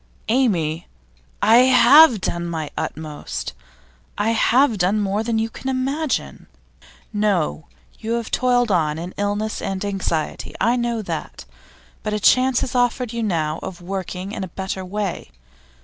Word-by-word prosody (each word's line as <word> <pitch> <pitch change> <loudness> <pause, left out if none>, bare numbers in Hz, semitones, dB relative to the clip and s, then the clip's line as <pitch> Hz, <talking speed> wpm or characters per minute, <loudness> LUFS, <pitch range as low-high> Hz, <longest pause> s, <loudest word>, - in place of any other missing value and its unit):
'Amy, 175 -10 +1 0.6
I 225 +2 +6
have 255 0 +7
done 170 0 -2
my 160 -3 -4
utmost. 155 - -5 0.6
I 210 +2 +1
have 230 0 +3
done 190 +4 +2
more 205 +1 0
than 225 0 -1
you 220 0 +1
can 260 +4 -6
imagine.' 265 - -2 0.7
'No. 200 -7 0 0.3
You 225 +1 -3
have 235 -1 -3
toiled 245 -2 +2
on 155 -4 +1
in 175 +3 -6
illness 205 +2 -2
and 195 +1 -3
anxiety 190 -6 -3
I 235 +2 +3
know 235 -2 -1
that. - - -6 0.6
But 215 - -3
a - - -1
chance 255 +4 +4
is 250 - -4
offered 245 -1 0
you 235 - -2
now 165 -7 -1
of 180 - -7
working 185 +1 -5
in 200 - -4
a - - -4
better 190 +1 -5
way. 195 - -4
210 Hz, 150 wpm, -21 LUFS, 180-240 Hz, 0.7 s, have